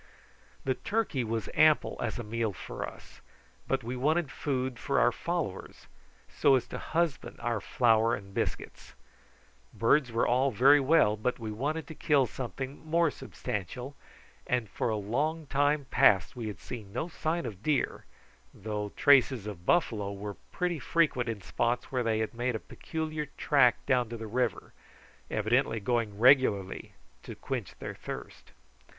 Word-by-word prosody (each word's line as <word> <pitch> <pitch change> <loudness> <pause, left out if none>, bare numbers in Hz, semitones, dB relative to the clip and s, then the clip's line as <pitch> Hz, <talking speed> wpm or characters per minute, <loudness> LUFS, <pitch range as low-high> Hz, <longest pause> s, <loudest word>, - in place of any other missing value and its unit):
The 130 - +2
turkey 200 - -1
was 115 -1 -2
ample 155 -1 +4
as 115 - -2
a 120 - -4
meal 110 -1 -2
for - - -6
us, - - -16 0.5
but - - 0
we 120 +3 -4
wanted 155 +4 +1
food 130 -3 -2
for 140 - +1
our 120 - +4
followers, 165 - -4 0.4
so 140 -2 +3
as 130 - 0
to - - -5
husband 165 -4 -1
our 115 -3 -1
flour 115 -1 +3
and 100 -1 -11
biscuits. - - -4 0.8
Birds 125 +2 +3
were 115 - +1
all 130 +3 +3
very 135 +5 +6
well, 135 -6 +4
but 115 +4 -1
we 110 -2 -5
wanted 145 +9 -2
to 160 - -9
kill 145 -3 +3
something 130 +4 -6
more 165 0 +2
substantial, 125 +8 -5 0.5
and 125 -3 0
for - - -1
a 110 - 0
long 145 +10 -1
time 145 +1 +1
past 95 - +4
we 120 -3 -4
had 105 - -6
seen 110 -5 -8
no 125 +9 -2
sign 170 -1 -2
of 105 -5 -7
deer, 145 +2 0 0.5
though 105 0 -4
traces 135 -6 +4
of 95 -4 -8
buffalo 110 - +2
were 100 0 -6
pretty 175 -3 -1
frequent 130 -5 +1
in 105 -4 -5
spots 120 +1 -1
where 130 -2 0
they 115 -2 +1
had 110 +1 -2
made 120 +1 -1
a - - -2
peculiar 155 +2 -5
track 135 -4 +3
down 125 -3 +2
to 120 - -5
the 110 - -6
river, 115 -1 -2 0.6
evidently 115 +2 +1
going 110 -1 -1
regularly 115 -6 +3 0.3
to - - -9
quench - - -5
their - - -6
thirst. - - -9
125 Hz, 160 wpm, -30 LUFS, 110-145 Hz, 0.8 s, very